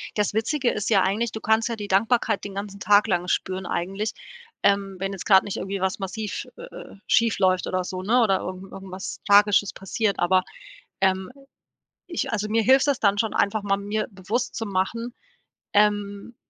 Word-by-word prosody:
Das 210 -1 0
Witzige 245 +4 0
ist 210 - -3
ja 200 -4 +4
eigentlich, 215 +4 0
du 220 - -6
kannst 220 +2 +1
ja 230 - -2
die 205 -1 -6
Dankbarkeit 215 +2 +1
den 200 -1 -7
ganzen 200 0 -6
Tag 205 +1 +4
lang 180 -3 0
spüren 185 +1 -1
eigentlich, 195 +6 -2 0.5
ähm, 200 -1 +2
wenn 195 +1 -3
jetzt 190 - -7
grad 190 -3 +6
nicht 205 - -5
irgendwie 195 0 -4
was 190 +2 -1
massiv, 205 +2 -4
sch - - -4
äh - - -10
äh, - - -11
schiefläuft 190 -5 +2
oder 185 0 -1
so, 185 0 -5
ne 240 +5 +3
oder 195 -4 +3
irgend 185 +1 -7
irgendwas 190 0 -7
Tragisches 205 -1 +5
passiert, 200 +2 -2
aber, 185 +1 +3 0.6
ähm, 190 -1 +1 0.8
ich 340 - -3
also 210 -1 -1
mir 225 +1 +2
hilft 265 +4 +4
es 280 -3 +2
dann 200 -1 +3
schon, 225 -1 0
einfach 205 +1 +1
mal 195 -1 +1
mir 210 +2 -2
bewusst 200 +5 -3
zu 225 - -3
machen, 230 +5 -2 0.6
ähm 205 +1 +1
205 Hz, 190 wpm, -24 LUFS, 190-220 Hz, 0.8 s, grad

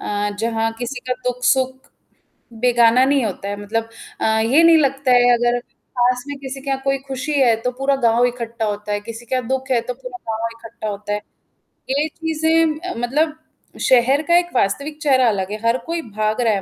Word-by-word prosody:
अ, 205 0 -2
जहाँ 225 0 0
किसी 245 +1 -4
का - - +4
दुःख-सुख। 255 +1 +1 0.8
बेगाना 245 0 +5
नहीं 275 -2 +2
होता 200 -1 -4
है 205 - -2
मतलब 225 +2 -2 0.3
अ, - - +1
ये 220 +8 +3
नहीं 335 -1 +7
लगता 275 -3 +1
है 245 0 +5
अगर 240 0 +2 0.4
पास 245 0 +2
में 285 -1 -5
किसी 270 0 -7
का 275 0 -1
कोई 275 0 +1
खुशी 270 +3 -4
है 240 -4 +5
तो 250 +1 -1
पूरा 270 +2 0
गाँव 230 +1 +4
ही 245 - +4
इकट्ठा 235 -2 -4
होता 210 0 -3
है 205 - 0
किसी 230 +2 -9
का 255 +2 0
दुःख 265 +2 -3
है 245 - +4
तो 250 - -2
पूरा 250 -1 -9
गाँव 225 +1 -2
इकट्ठा 230 -1 -8
होता 205 0 -4
है। 210 - -1 0.7
ये 285 +3 +1
चीज़ें 320 0 0
अ, 365 +2 -5
मतलब 300 +7 0 0.5
शहर 260 +3 +4
का 345 0 +5
एक 350 0 -4
वास्तविक 280 +8 0
चेहरा 260 -4 +4
अलग 195 -2 -2
है, 215 - -3
हर 235 - +3
कोई 335 0 -2
भाग 215 0 -2
रहा 230 -3 +3
है 195 - -1
250 Hz, 200 wpm, -20 LUFS, 225-275 Hz, 0.8 s, नहीं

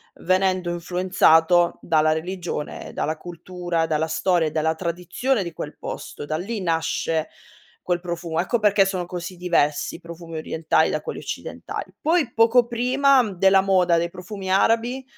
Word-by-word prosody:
venendo 185 0 +1
influenzato 175 -1 +3
dalla 155 -1 +2
religione, 170 -1 -4
dalla 155 +1 -1
cultura, 175 0 -3
dalla 160 0 0
storia 170 0 +1
e - - -14
dalla 160 +1 0
tradizione 180 +8 -1
di 170 - -7
quel 150 -1 -7
posto. - - -7
Da 155 - -2
lì 200 +7 -4
nasce 165 -1 -1 0.5
quel 175 -1 -1
profumo. 170 -2 -3
Ecco 235 +5 0
perché 205 -1 +4
sono 190 -2 -2
così 180 +1 -6
diversi 170 -5 0
i - - -10
profumi 170 0 -10
orientali 160 0 +1
da 155 - -1
quelli - - -6
occidentali. - - -6
Poi 315 -6 +1
poco 230 +2 +4
prima 255 +3 +3
della 190 +1 +4
moda 185 -3 +3
dei 170 +1 0
profumi 190 +1 -7
arabi, 230 +6 +2
175 Hz, 150 wpm, -23 LUFS, 165-195 Hz, 0.5 s, perché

